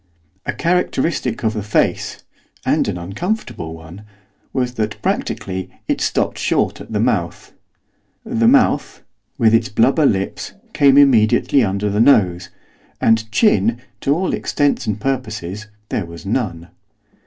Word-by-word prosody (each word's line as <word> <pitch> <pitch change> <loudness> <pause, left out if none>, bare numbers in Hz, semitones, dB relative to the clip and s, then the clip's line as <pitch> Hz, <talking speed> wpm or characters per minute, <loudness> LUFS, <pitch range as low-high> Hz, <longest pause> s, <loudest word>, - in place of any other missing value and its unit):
A - - -1
characteristic 170 -8 -1
of 110 -1 +1
the 110 - -3
face 105 +1 -1 0.4
and - - +2
an - - -2
uncomfortable 100 - -4
one! 80 +4 -12 0.5
was 125 -2 -1
that, 110 -3 -3
practically, 95 -1 -2 0.2
it 290 -2 -1
stopped - - 0
short - - 0
at - - -11
the - - -1
mouth. - - -1 0.7
The 230 0 +1
mouth, 255 0 +2 0.3
with 115 -4 +4
its 115 0 +3
blubber 135 +7 +3
lips, 95 -4 -2 0.2
came 140 -2 +5
immediately 130 0 +4
underneath 100 0 -1
the 105 - +2
nose, 95 -8 +3 0.5
and 110 -1 +2
chin, 115 - +2 0.2
to 140 - +1
all 185 +3 -1
intents 145 -1 0
and 105 -1 -1
purposes, 110 -6 -4 0.2
there 90 - -2
was 85 +2 -11
none. 95 -6 -2
110 Hz, 135 wpm, -19 LUFS, 95-140 Hz, 0.7 s, came